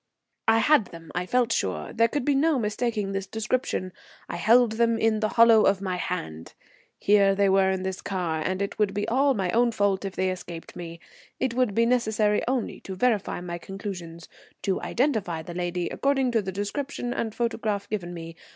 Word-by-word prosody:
I 225 0 +5
had 245 0 +4
them, 165 -2 -12
I 180 0 -2
felt 245 0 +2
sure. 90 - -2
There 230 0 +4
could 250 +2 -2
be 290 - +3
no 295 +2 +3
mistaking 215 -2 -1
this 195 0 -3
description. 220 -3 -2 0.3
I - - -5
held 235 0 +5
them 230 0 +2
in 225 -1 +2
the 215 - +1
hollow 230 -1 +7
of 195 -2 +3
my 185 -2 -2
hand. 80 - -5 0.4
Here 200 -1 +4
they 200 0 +3
were 190 0 +4
in 190 -1 -1
this 190 0 -4
car, 175 -5 -2
and 185 +3 -1
it 200 - -5
would 205 -2 +1
be 205 - -1
all 270 +3 +3
my 190 -4 -1
own 235 +1 +3
fault 200 -3 +1
if 195 -1 -5
they 185 0 +1
escaped 175 -2 -8
me. 170 -1 -8 0.4
It 260 -3 0
would 245 -5 +1
be 230 - +4
necessary 220 -3 +2
only 255 -2 -1
to 190 - -7
verify 215 -4 0
my 175 -1 -5
conclusions, 180 -4 -7 0.4
to 195 - 0
identify 220 - -1
the 175 - -8
lady 175 0 -2
according 270 -2 +1
to 230 -2 +2
the 190 -1 -4
description 245 +5 -3
and 220 -2 -3
photograph 220 -4 -1
given 185 -5 -4
me. 165 -1 -8
205 Hz, 195 wpm, -26 LUFS, 185-230 Hz, 0.4 s, hollow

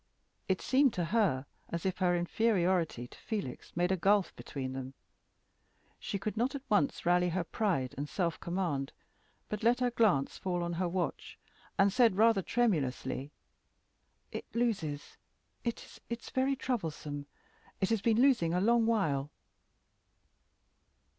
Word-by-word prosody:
It 190 -1 0
seemed 265 -2 +3
to 175 -3 0
her 170 - +1 0.2
as 170 +1 -4
if 190 -1 -1
her 180 -2 +3
inferiority 175 - +1
to - - -15
Felix 200 - -5
made 175 +1 +2
a - - +4
gulf 195 +1 +2
between 130 -2 -5
them. 130 0 -6 1.0
She 200 - -3
could 205 +2 -3
not 245 +5 0
at 275 - -5
once 205 -3 +1
rally 180 +1 +3
her 175 +1 -1
pride 165 - -1
and 145 +1 -3
self 170 -4 -1
command, 170 -7 -2 0.5
but 210 - -4
let 235 +2 +3
her 250 -1 +1
glance 210 - +2
fall 180 -2 -1
on 170 0 -2
her 180 +2 0
watch, 180 0 -3 0.4
and 195 0 +4
said, 235 -5 +4
rather 220 -2 +5
tremulously, 150 - 0 1.0
"It - - -5
loses. 190 -12 -1 0.5
It 235 -1 -5
is 235 0 -5
very 265 +1 +1
troublesome. 155 - -3 0.5
It 190 +3 +1
has 225 -3 +2
been 225 +1 +3
losing 235 -11 +4
a - - +2
long 230 +3 +3
while." 150 -11 +1
190 Hz, 145 wpm, -32 LUFS, 165-225 Hz, 1.0 s, rather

